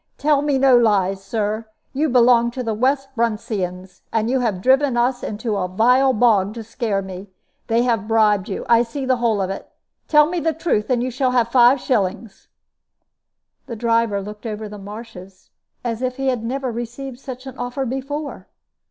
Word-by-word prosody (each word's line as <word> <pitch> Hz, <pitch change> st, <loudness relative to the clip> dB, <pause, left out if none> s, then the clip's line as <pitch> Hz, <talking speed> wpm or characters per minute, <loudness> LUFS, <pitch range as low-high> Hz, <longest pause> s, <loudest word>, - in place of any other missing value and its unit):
"Tell 290 Hz, -1 st, +2 dB
me 290 Hz, -2 st, +1 dB
no 265 Hz, -1 st, +5 dB
lies, 195 Hz, -5 st, +2 dB
Sir; 215 Hz, +2 st, -2 dB, 0.3 s
you 300 Hz, +3 st, 0 dB
belong 240 Hz, -1 st, +4 dB
to 255 Hz, -, -2 dB
the 225 Hz, -2 st, -2 dB
West 270 Hz, +4 st, 0 dB
Bruntseyans, 195 Hz, -5 st, -3 dB
and 225 Hz, +1 st, 0 dB
you 265 Hz, -, +2 dB
have 220 Hz, -7 st, -1 dB
driven 265 Hz, +3 st, +3 dB
us 245 Hz, +1 st, +1 dB
into 215 Hz, +1 st, -3 dB
a 185 Hz, -2 st, -1 dB
vile 250 Hz, +8 st, +3 dB
bog 215 Hz, -4 st, +2 dB
to 230 Hz, -, -6 dB
scare 220 Hz, -3 st, -2 dB
me. 190 Hz, +1 st, -9 dB, 0.4 s
They 230 Hz, +1 st, +2 dB
have 230 Hz, -4 st, 0 dB
bribed 210 Hz, -3 st, +2 dB
you. 195 Hz, -, -4 dB
I 235 Hz, 0 st, +5 dB
see 250 Hz, +4 st, -4 dB
the 255 Hz, -1 st, +2 dB
whole 225 Hz, -4 st, +1 dB
of 190 Hz, -, -3 dB
it. 195 Hz, -, -7 dB, 0.4 s
Tell 300 Hz, -1 st, +6 dB
me 350 Hz, +2 st, -2 dB
the 325 Hz, 0 st, 0 dB
truth, 300 Hz, -9 st, -1 dB
and 245 Hz, -2 st, +1 dB
you 255 Hz, -, -2 dB
shall 255 Hz, +1 st, 0 dB
have 235 Hz, -2 st, +2 dB
five 250 Hz, +2 st, +6 dB
shillings." 215 Hz, -3 st, -2 dB, 1.2 s
The 235 Hz, -, -5 dB
driver 230 Hz, -3 st, +1 dB
looked 210 Hz, +3 st, -8 dB
over 215 Hz, 0 st, -5 dB
the 210 Hz, 0 st, -9 dB
marshes 195 Hz, -2 st, -11 dB, 0.3 s
as 235 Hz, -1 st, -3 dB
if 255 Hz, -1 st, -2 dB
he 270 Hz, -1 st, 0 dB
had 245 Hz, -3 st, -2 dB
never 260 Hz, +2 st, -2 dB
received 240 Hz, +2 st, -6 dB
such 260 Hz, -1 st, -8 dB
an 265 Hz, -, -8 dB
offer 245 Hz, +2 st, -3 dB
before. 275 Hz, +4 st, -5 dB
235 Hz, 185 wpm, -21 LUFS, 210-260 Hz, 1.2 s, Tell